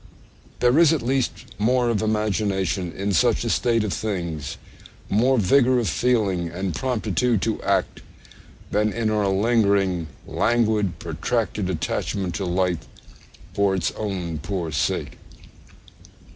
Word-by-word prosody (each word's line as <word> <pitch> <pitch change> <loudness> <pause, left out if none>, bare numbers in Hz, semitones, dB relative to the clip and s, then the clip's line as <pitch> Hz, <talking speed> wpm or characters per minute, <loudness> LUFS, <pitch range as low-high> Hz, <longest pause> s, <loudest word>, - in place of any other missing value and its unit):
There 125 +5 +4
is 165 -3 +6
at 155 - -1
least 130 +1 -1
more 120 +3 +2
of 110 -4 0
imagination 100 -4 0
in 100 +3 -2
such 80 - +3
a - - -1
state 115 -2 +2
of 105 - -2
things, 85 -9 -3 0.5
more 125 +6 +3
vigour 125 +5 +4
of 120 -3 0
feeling 100 -3 +1
and 90 +1 -3
promptitude 115 - 0
to 110 -2 -1
act, - - 0 0.7
than 105 +1 +2
in 110 -1 -1
our 105 -2 +1
lingering, 100 -4 +2 0.2
languid, 110 -4 +1
protracted 110 -5 -2
attachment 90 +2 -2
to 90 +4 -3
life 90 -1 0 0.7
for 100 -1 +2
its 85 -3 0
own 90 -7 -4
poor 85 -1 -3
sake. 70 - -2
105 Hz, 130 wpm, -23 LUFS, 95-115 Hz, 0.7 s, is